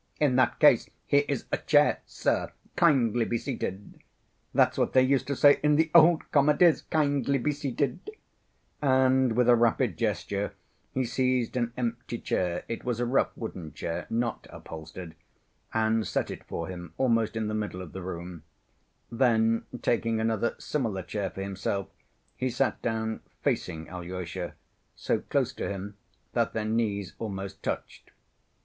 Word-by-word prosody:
"In 145 -4 +3
that 130 - +3
case, - - +5 0.2
here 145 0 +3
is 140 -4 -2
a - - +2
chair, - - +3
sir; - - -1 0.2
kindly 120 -8 +3
be 120 +1 -1
seated. 105 -6 -5 0.5
That's - - +3
what - - 0
they 130 - +6
used 135 0 +2
to 140 - -1
say 145 +2 +6
in 150 0 +4
the 160 +1 +2
old 170 0 +6
comedies, 150 +3 +5
'kindly 140 -3 +1
be 140 +4 0
seated,' 145 - -2 0.4
" - - -42
and 130 -2 +3
with 125 +1 +2
a 120 - +7
rapid 120 - +2
gesture 100 -1 -1 0.4
he 130 -1 0
seized 125 0 0
an 120 -2 0
empty 120 -1 -3
chair 90 -5 -1
(it 115 - -5
was 120 -2 -2
a 120 - +1
rough 125 +3 +2
wooden 90 -8 -6
chair, 85 - -4
not 115 +1 -2
upholstered) 80 +1 -9 0.6
and 110 -2 +1
set - - -1
it - - -8
for 85 - -4
him 85 -2 -8
almost 115 -4 +2
in 110 -1 -1
the 105 - -2
middle 105 -4 -3
of 85 - -10
the 95 - -6
room; 85 -2 -6 0.7
then, 115 -2 +2 0.2
taking 115 -1 +1
another 110 +1 0
similar 110 -10 -2
chair 100 +2 -3
for 95 - -6
himself, 100 0 -3 0.5
he 130 - -1
sat 130 +2 0
down 110 -1 -2 0.2
facing 80 0 -1
Alyosha, 90 0 -6 0.4
so - - 0
close - - -1
to - - -4
him 100 +1 -5 0.4
that - - +1
their 110 -1 -2
knees 105 -4 -1
almost 100 -3 -5
touched. - - -5
115 Hz, 160 wpm, -28 LUFS, 100-130 Hz, 0.7 s, a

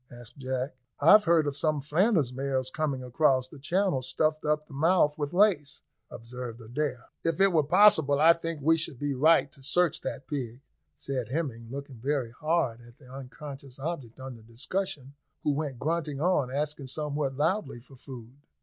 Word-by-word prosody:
asked 120 +2 -13
Jack, 130 0 -3 0.2
"I've 205 +8 +7
heard 165 -2 +4
of 145 -1 -2
some 150 +1 0
Flanders 155 - +1
mares 130 -1 -2
coming 140 -4 -2
across 130 0 +2
the 145 +2 -13
Channel 175 -1 0
stuffed 155 +4 0
up 150 0 0
to 150 - -15
the 135 - -6
mouth 160 -2 +3
with 145 -1 -3
lace," 175 -7 +2 0.3
observed 120 0 -8
Adair. 125 +2 -4
"If 165 0 -1
it 195 -1 +4
were 160 - +5
possible, 160 -3 +5
I 165 +2 +7
think 165 -2 -5
we 165 +2 +4
should 155 -4 -2
be 145 +2 -2
right 145 0 +4
to 140 - -17
search 170 +4 +1
that 135 - -6
pig," 130 -3 -5 0.3
said 135 -5 -4
Hemming, 130 -6 -3
looking 140 0 -7
very 130 -1 -2
hard 135 -4 -1
at 120 +1 -17
the 140 - -18
unconscious 135 0 -9
object 135 -6 -5
under 130 -3 -8
discussion, 135 - -4 0.3
who 150 - +2
went 140 -3 -3
grunting 150 0 -2
on, 155 -5 +1
asking 145 0 -3
somewhat 145 -1 -3
loudly 160 - -1
for 135 +3 -17
food. 125 -1 -11
140 Hz, 175 wpm, -28 LUFS, 130-155 Hz, 0.3 s, I've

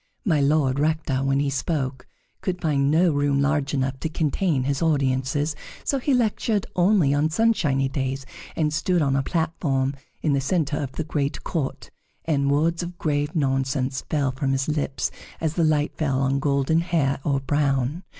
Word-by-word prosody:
My 160 -8 +3
Lord 140 -2 +2
Rector, 150 -3 0
when 135 0 +2
he 140 -1 0
spoke, 135 -3 -2 0.3
could 180 -1 -2
find 140 -4 +1
no 165 +3 +4
room 145 -1 +1
large 140 0 +1
enough 130 0 -1
to 160 - -2
contain 155 -2 0
his 140 +1 -1
audiences, 145 -1 +1 0.3
so 275 - 0
he 280 - -1
lectured 220 -4 +1
only 180 -5 +4
on 145 +2 +2
sunshiny 160 -9 +2
days, 135 0 -3 0.3
and 150 -2 0
stood 170 +1 +1
on 135 -1 +1
a 135 - +2
platform 140 -4 0 0.3
in 150 - +2
the 140 - +1
centre 145 0 0
of 135 -2 -5
the 160 - -3
great 145 -2 -2
court; 150 -6 -3 0.3
and 140 -3 +1
words 165 +4 +2
of 175 0 -6
grave 145 -1 -1
nonsense 135 -2 0
fell 140 -4 +1
from 135 +1 -1
his 135 0 0
lips 150 -3 -1 0.3
as 160 -1 -1
the 170 - +1
light 150 -1 +1
fell 135 -4 0
on 135 +1 +1
golden 140 +3 +2
hair 160 -6 0
or 140 -2 +1
brown. 140 +2 0
145 Hz, 175 wpm, -24 LUFS, 135-160 Hz, 0.3 s, no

